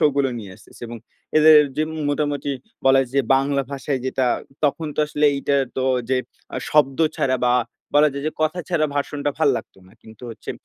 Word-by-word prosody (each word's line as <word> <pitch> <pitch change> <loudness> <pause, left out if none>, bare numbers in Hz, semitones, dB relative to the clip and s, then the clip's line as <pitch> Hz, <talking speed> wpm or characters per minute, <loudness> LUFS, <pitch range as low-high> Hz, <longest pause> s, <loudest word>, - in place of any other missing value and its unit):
শোগুলো 140 -3 +2
নিয়ে 100 -3 -9
আসতেছে - - -18
এবং 120 0 -7 0.4
এদের 155 0 +8 0.2
যে 155 - +1 0.3
মোটামুটি 145 -1 -1 0.4
বলা 135 0 +6
যায় 130 -2 -3
যে - - +6
বাংলা 140 +1 +1
ভাষায় 140 0 -2
যেটা 130 0 0 0.4
তখন 155 +2 0
তো - - -18
আসলে 150 0 -1
এইটা 140 +1 -2 0.2
তো 130 - 0 0.3
যে 130 - +3 0.4
আ - - -2
শব্দ 145 -2 +3 0.2
ছাড়া 130 -1 +1
বা, 125 - +3 0.4
বলা 150 +1 +6
যায় 140 0 -5
যে - - 0
কথা 155 +3 0
ছাড়া 165 -4 +1
ভাষণটা 145 0 -2
ভাল 155 -3 +3
লাগতো 100 - -9
না। 95 - -20
কিন্তু 110 +1 -16
হচ্ছে - - -8
140 Hz, 190 wpm, -22 LUFS, 135-150 Hz, 0.4 s, এদের